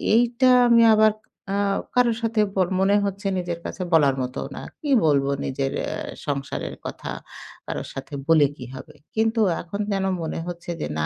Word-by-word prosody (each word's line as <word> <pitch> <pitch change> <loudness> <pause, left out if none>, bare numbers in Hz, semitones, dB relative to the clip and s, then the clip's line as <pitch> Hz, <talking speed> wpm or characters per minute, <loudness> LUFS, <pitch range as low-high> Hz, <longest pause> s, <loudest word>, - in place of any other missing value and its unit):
এইটা 240 +2 +3 0.2
আমি 230 0 +6
আবার 215 0 +5 0.4
আ - - +1 0.4
কারো 245 -2 +4
সাথে 225 -1 +1
ব - - -6 0.2
মনে 195 +1 +4
হচ্ছে 200 +1 -3
নিজের 175 -1 -4
কাছে 185 - -4
বলার 140 -4 +5
মতো 125 0 -5 0.2
না। - - -6 0.2
কি 295 - -5 0.2
বলবো 140 -2 +3 0.2
নিজের 135 0 -2
এ - - -4 0.4
সংসারের 140 -1 -3
কথা? - - -6 0.6
কারো - - -3
সাথে 135 +2 -8
বলে 160 -3 +6
কি 125 - -8
হবে? 130 - -11 0.2
কিন্তু 225 +1 +1 0.2
এখন 200 +5 -5
যেন 195 -1 0 0.2
মনে 160 - -3
হচ্ছে 175 0 -6
যে, - - -1
না, 75 - 0
180 Hz, 175 wpm, -23 LUFS, 145-220 Hz, 0.6 s, আমি